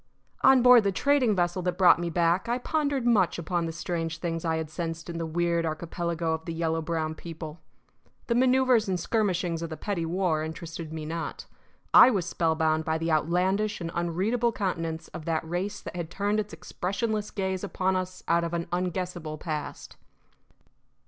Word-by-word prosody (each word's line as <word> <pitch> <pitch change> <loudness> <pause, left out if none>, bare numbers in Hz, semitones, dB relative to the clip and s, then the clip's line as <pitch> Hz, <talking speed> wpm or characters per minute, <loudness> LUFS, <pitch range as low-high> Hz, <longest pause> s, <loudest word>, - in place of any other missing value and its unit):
On 265 -2 +6
board 250 -2 +8
the 200 - +2
trading 255 0 +2
vessel 175 0 0
that 180 0 -2
brought 180 -2 +6
me 175 0 -2
back 170 +5 +1
I 240 - +1
pondered 285 -1 -1
much 210 -7 +3
upon 170 0 -1
the - - -3
strange 165 0 -3
things 165 -2 -3
I 160 -1 0
had 160 -1 -4
sensed 165 0 -4
in 165 - -5
the 165 - -2
weird 170 +1 0
archipelago 165 +1 -2
of 160 0 -4
the 165 - -4
yellow 165 0 0
brown 160 -1 -2
people. 160 -1 -8 0.7
The 235 - 0
manoeuvres 255 -3 +3
and 185 -1 0
skirmishings 180 -7 0
of 165 - -4
the 155 - -6
petty 180 -6 -2
war 175 -2 0
interested 165 0 -6
me 160 -1 -5
not: 165 +1 -5 0.5
I - - +10
was 195 -8 0
spellbound 160 -2 +1
by 160 0 0
the 165 +1 -1
outlandish 190 +7 +1
and 165 -2 -4
unreadable 195 +8 0
countenance 165 -6 -3
of 155 - -8
that 160 -1 -1
race 190 +5 -3
that - - -8
had 170 -2 -4
turned 205 +4 0
its 210 -1 -3
expressionless 210 +3 -3
gaze 190 -2 -2
upon 190 -1 0
us 185 0 -4
out 170 0 +3
of 170 0 -2
an 170 0 -2
unguessable 175 -3 -3
past. 155 -2 -6
175 Hz, 180 wpm, -27 LUFS, 165-195 Hz, 0.7 s, I